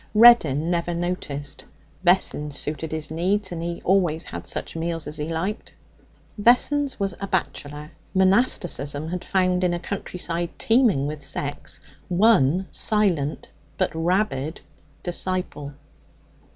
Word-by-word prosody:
Reddin 175 - +6
never 170 0 0
noticed. 160 -5 -3 0.4
Vessons 150 -5 +2
suited 155 +1 -3
his 155 -1 -4
needs, 185 +4 0
and 170 -1 -4
he 170 0 -4
always 175 -4 +2
had - - -8
such - - -4
meals 165 0 -2
as 150 +1 -6
he 150 +1 -3
liked. 175 +6 -3 0.7
Vessons 265 +5 +3
was 195 -2 0
a 200 - -2
bachelor. 150 -5 -3 0.2
Monasticism 175 - +2
had 180 +1 -4
found, 185 -1 +1
in 175 -1 +2
a - - -3
countryside 175 -2 -3
teeming 225 - +3
with 150 +1 -4
sex, 145 +1 -4 0.3
one 185 -3 +4
silent 180 -9 +1 0.3
but - - +1
rabid 165 -3 0 0.4
disciple. 175 -5 -2
175 Hz, 125 wpm, -24 LUFS, 150-190 Hz, 0.7 s, Reddin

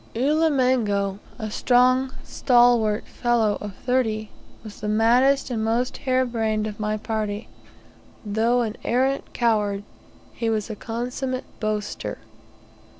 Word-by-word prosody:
Ulimengo, 250 -8 +1 0.2
a 215 -3 -5
strong 255 +3 +3
stalwart 240 -4 +3
fellow 230 -4 0
of 205 -2 -6
thirty, 220 -4 0 0.3
was 215 -2 -10
the 210 - -3
maddest 245 +6 +3
and 220 -2 -1
most 235 +3 0
hare 260 -1 +1
brained 220 -3 -1
of 210 -1 -6
my 215 0 -1
party. 215 -1 -3 0.8
Though 225 +4 +2
an 220 -2 -3
arrant 265 +3 0
coward, 210 -4 +1 0.5
he 230 - -2
was 220 0 -1
a - - -5
consummate 250 +4 -4
boaster. 215 -1 -3
225 Hz, 120 wpm, -24 LUFS, 215-250 Hz, 0.8 s, strong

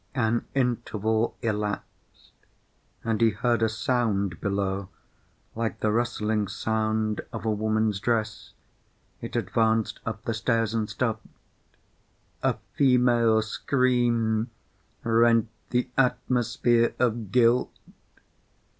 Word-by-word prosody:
An 115 -2 0
interval 115 -3 0
elapsed, 105 -2 -4 0.7
and 115 -1 -1
he 115 - +6
heard 115 +2 0
a 110 - +3
sound 110 - -1
below 100 -1 -2 0.6
like 115 0 -3
the 105 - +2
rustling 110 -2 0
sound 110 +1 -1
of - - -6
a 110 - +2
woman's 110 -1 0
dress. 110 -1 -2 0.7
It - - -7
advanced 110 -1 +1
up 110 -1 -5
the 115 - -2
stairs, 115 -1 0
and 110 -2 -1
stopped. 110 -3 -2 1.1
A - - +1 0.2
female 120 -4 +4
scream 120 -2 +1 0.5
rent 115 0 +3 0.2
the 125 +1 0
atmosphere 125 -2 +2
of 115 -5 0
guilt. 125 0 +3
115 Hz, 100 wpm, -26 LUFS, 110-120 Hz, 1.1 s, he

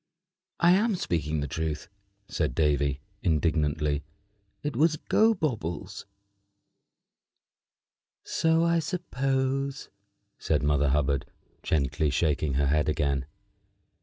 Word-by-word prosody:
"I 170 +1 +5
am 205 +3 +3
speaking 80 - -1
the 70 - -2
truth," 80 +1 -3 0.4
said 75 -3 -2
Davy, 70 -3 +1 0.2
indignantly. 75 -2 +1 0.6
"It 145 -3 -3
was 155 +4 +3
Gobobbles." 155 - 0 2.2
"So 165 0 +2
I 170 0 +3
supposed," 135 -5 -2 0.5
said 75 -2 0
Mother 75 -1 +2
Hubbard, 70 -1 +1 0.3
gently 75 0 0
shaking 75 -2 0
her 70 +1 +2
head 75 +2 +2
again. 70 -3 0
80 Hz, 95 wpm, -27 LUFS, -, 2.2 s, I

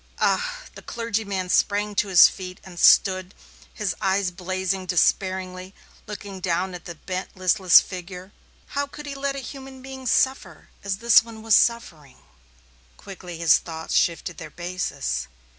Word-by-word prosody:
"Ah!" - - 0
The - - -11
clergyman 210 -5 -3
sprang 205 +2 +1
to 210 - +2
his 185 -3 +8
feet 185 -1 -8
and 180 -2 -11
stood, 185 -1 +4 0.4
his 205 -4 -3
eyes 190 -1 +1
blazing, 185 +1 -3
despairing, 185 +1 0 0.3
looking 205 -2 -8
down 180 +1 -1
at 175 -1 -9
the 170 - -7
bent, 185 +4 -6
listless 185 -1 +6
figure. 185 +1 -9 0.4
How 285 0 -2
could 295 +1 -10
he 285 - -5
let 275 0 -3
a 270 -2 -6
human 265 -1 -10
being 265 -1 -8
suffer 230 - 0
as 195 -1 -2
this 235 +1 +6
one 225 -1 -11
was 225 -1 +2
suffering? 165 - 0 0.8
Quickly 180 -3 -10
his 165 -2 +4
thoughts 160 -1 -7
shifted 170 0 0
their - - -8
basis. 175 - -4
190 Hz, 150 wpm, -24 LUFS, 180-225 Hz, 0.8 s, his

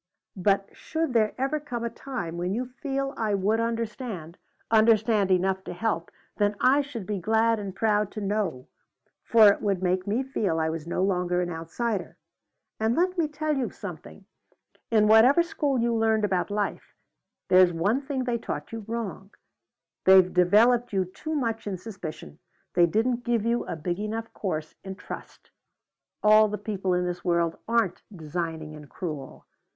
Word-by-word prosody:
But 195 +1 +1
should 320 -4 -3
there 215 -2 +2
ever 270 +4 0
come 250 -6 -5
a 235 - -1
time 235 -9 -5
when 180 +3 -1
you 250 +2 -2
feel 275 +1 -3
I 215 -2 0
would 205 +3 +1
understand, 230 - -4 0.3
understand 220 -2 +4
enough 190 +1 +1
to - - -5
help, 175 -3 -2 0.3
then 205 0 +1
I 275 +3 +4
should 255 -8 -7
be 205 0 -3
glad 225 +4 +2
and 195 -2 -6
proud 210 -1 +1
to 215 - -5
know, 200 -10 -2 0.6
for 220 -3 +7
it 200 - +1
would 195 -3 0
make 185 +1 0
me 225 +6 0
feel 205 -11 -1
I 160 0 0
was 165 0 -6
no 175 +2 -1
longer 180 -2 +1
an 175 - -4
outsider. 175 +5 -3 0.6
And 220 +2 +1
let 365 +2 +1
me 335 -4 +1
tell 300 0 -2
you 265 -3 -1
something. - - -10 0.6
In 215 -2 +4
whatever 245 +10 +6
school 290 -5 -1
you 235 0 +1
learned 220 -1 +2
about 185 -2 0
life, 205 0 -3 0.5
there's 185 -1 +6
one 200 +10 +1
thing 275 -2 -3
they 240 -2 -1
taught 150 -9 -5
you 225 -1 -6
wrong. 220 -4 -5 0.8
They've 190 -1 +6
developed 225 +7 +4
you 190 -1 +1
too 310 - -6
much 225 -6 -2
in 195 -2 -2
suspicion. 165 - -8 0.3
They 175 -1 +5
didn't 235 +6 0
give 235 -3 0
you 235 +1 0
a - - -3
big 175 +3 -3
enough 225 +2 -4
course 155 -6 -4
in 190 0 -6
trust. - - -10 0.7
All 215 0 +7
the 210 0 -3
people 195 -3 -2
in 180 0 0
this 175 0 -4
world 170 -2 +1
aren't 230 -6 +1 0.2
designing 160 -1 -4
and 150 -2 -12
cruel. 150 -5 -7
210 Hz, 170 wpm, -26 LUFS, 180-235 Hz, 0.8 s, for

